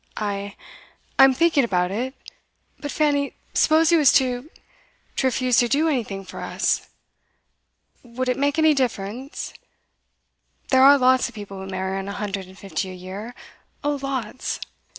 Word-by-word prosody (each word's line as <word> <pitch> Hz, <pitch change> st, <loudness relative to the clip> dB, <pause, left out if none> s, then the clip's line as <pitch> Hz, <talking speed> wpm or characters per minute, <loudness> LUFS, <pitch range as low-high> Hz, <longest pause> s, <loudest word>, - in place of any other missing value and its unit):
'I 200 Hz, -1 st, -3 dB, 0.6 s
I'm 270 Hz, -1 st, +7 dB
thinking 320 Hz, -1 st, +3 dB
about 180 Hz, -5 st, 0 dB
it. 255 Hz, +6 st, -3 dB, 0.6 s
But, 290 Hz, -, -5 dB
Fanny, 290 Hz, -2 st, +1 dB, 0.2 s
suppose 320 Hz, +1 st, +4 dB
he 340 Hz, -, +6 dB
was 295 Hz, -4 st, +6 dB
to 255 Hz, +2 st, +1 dB, 0.7 s
to 265 Hz, -, +2 dB
refuse 255 Hz, -1 st, +1 dB
to 240 Hz, -, +4 dB
do 295 Hz, +6 st, +2 dB
anything 220 Hz, -10 st, -2 dB
for -, -, -9 dB
us. -, -, -1 dB, 1.1 s
Would 250 Hz, +1 st, -5 dB
it 250 Hz, -, +2 dB
make 285 Hz, +2 st, +1 dB
any 315 Hz, -1 st, +5 dB
difference? 250 Hz, 0 st, -3 dB, 1.2 s
There 260 Hz, -1 st, +5 dB
are 280 Hz, +2 st, +8 dB
lots 255 Hz, -1 st, +3 dB
of 240 Hz, -, -17 dB
people 200 Hz, -2 st, -8 dB
who 190 Hz, -, -7 dB
marry 190 Hz, 0 st, -2 dB
on 195 Hz, -, -6 dB
a 200 Hz, -, -4 dB
hundred 200 Hz, -2 st, -4 dB
and 190 Hz, +1 st, -15 dB
fifty 195 Hz, -1 st, -4 dB
a 185 Hz, -, -8 dB
year 195 Hz, +6 st, -8 dB, 0.5 s
oh 290 Hz, -1 st, 0 dB
lots! 260 Hz, -3 st, -3 dB
250 Hz, 155 wpm, -23 LUFS, 200-280 Hz, 1.2 s, are